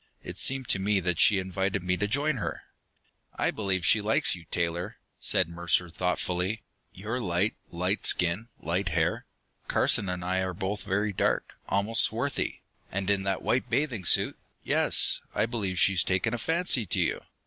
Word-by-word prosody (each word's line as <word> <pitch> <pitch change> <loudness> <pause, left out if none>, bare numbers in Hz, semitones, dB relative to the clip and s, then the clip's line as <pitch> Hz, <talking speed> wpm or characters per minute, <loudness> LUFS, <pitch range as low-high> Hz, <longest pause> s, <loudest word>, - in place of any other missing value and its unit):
It - - -6
seemed 135 -2 +3
to 100 - +3
me 100 +1 +1
that 90 -2 -1
she 105 - +6
invited 95 +1 -2
me 90 0 +1
to 105 - 0
join 140 +5 +1
her. 110 - -4 0.7
"I - - +1
believe 95 -5 -1
she 105 - +4
likes 110 +2 +2
you, 85 -2 -13
Taylor," 85 +4 -2 0.2
said - - +2
Mercer 85 +1 0
thoughtfully. 90 +4 -2 0.3
"You're 110 +6 -4
light, 95 +1 0 0.2
light 90 +4 -1
skin, 90 +6 +1
light 90 +4 -1
hair. 80 +1 0 0.4
Carson 100 - +2
and 90 -1 -4
I 95 +1 0
are 95 -1 -3
both 100 +3 -3
very 105 +1 0
dark, - - 0 0.2
almost 105 +3 +2
swarthy. 125 +6 0 0.3
And 95 +1 0
in 100 -1 +1
that 95 -1 -1
white 130 - 0
bathing 125 - -1
suit - - +4 0.2
yes, - - +1
I - - +2
believe 105 -6 -3
she's 95 -1 +4
taken 95 +5 0
a 120 - -2
fancy 160 - +2
to - - +2
you!" - - 0
95 Hz, 170 wpm, -28 LUFS, 90-110 Hz, 0.7 s, she